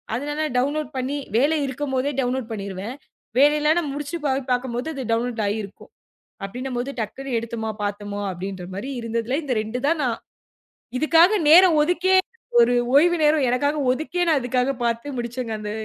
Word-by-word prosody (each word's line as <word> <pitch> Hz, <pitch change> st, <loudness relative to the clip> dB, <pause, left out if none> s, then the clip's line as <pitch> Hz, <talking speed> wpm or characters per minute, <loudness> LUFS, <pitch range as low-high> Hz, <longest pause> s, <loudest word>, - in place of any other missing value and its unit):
அதனால 295 Hz, +4 st, -2 dB
டவுன்லோட் 290 Hz, +2 st, -1 dB
பண்ணி 265 Hz, +3 st, -2 dB, 0.2 s
வேலை 300 Hz, +5 st, +3 dB
இருக்கும்போதே 265 Hz, +1 st, -2 dB
டவுன்லோட் 250 Hz, -2 st, -2 dB
பண்ணிருவேன். 200 Hz, +3 st, -5 dB, 0.4 s
வேலை 295 Hz, +2 st, +6 dB
இல்லன்னா 315 Hz, +3 st, +3 dB
முடிச்சு 295 Hz, +4 st, -4 dB
போய் 270 Hz, -1 st, +1 dB
பாக்கும்போது 250 Hz, +2 st, -1 dB
இது 270 Hz, -, -4 dB
டவுன்லோட் 230 Hz, 0 st, 0 dB
ஆயி 205 Hz, +2 st, -1 dB
இருக்கும். 200 Hz, 0 st, -12 dB, 0.6 s
அப்படின்னும்போது 250 Hz, +4 st, -4 dB
டக்குன்னு 250 Hz, +3 st, -4 dB
எடுத்தோமா, 225 Hz, -1 st, -4 dB
பாத்தோமா 205 Hz, 0 st, -4 dB
அப்படின்ற 185 Hz, +1 st, -6 dB
மாரி 215 Hz, +8 st, -5 dB
இருந்ததில 230 Hz, +3 st, -2 dB
இந்த 260 Hz, -, -1 dB
2 220 Hz, +3 st, -4 dB
தான் 330 Hz, 0 st, +1 dB
நான் 235 Hz, -3 st, -1 dB, 0.8 s
இதுக்காக 335 Hz, +7 st, +5 dB
நேரம் 350 Hz, 0 st, +8 dB
ஒதுக்கி, 360 Hz, +3 st, +1 dB, 0.5 s
ஒரு 245 Hz, -, +4 dB, 0.2 s
ஓய்வு 345 Hz, +4 st, +5 dB
நேரம் 300 Hz, -2 st, +4 dB
எனக்காக 285 Hz, +4 st, +1 dB
ஒதுக்கி 315 Hz, +7 st, -3 dB
நான் 310 Hz, -3 st, +4 dB
இதுக்காகப் 250 Hz, +1 st, 0 dB
பாத்து 235 Hz, +4 st, -2 dB
முடிச்சேங்க. 235 Hz, -1 st, -4 dB
அந்த 210 Hz, 0 st, -5 dB
255 Hz, 150 wpm, -23 LUFS, 230-295 Hz, 0.8 s, நேரம்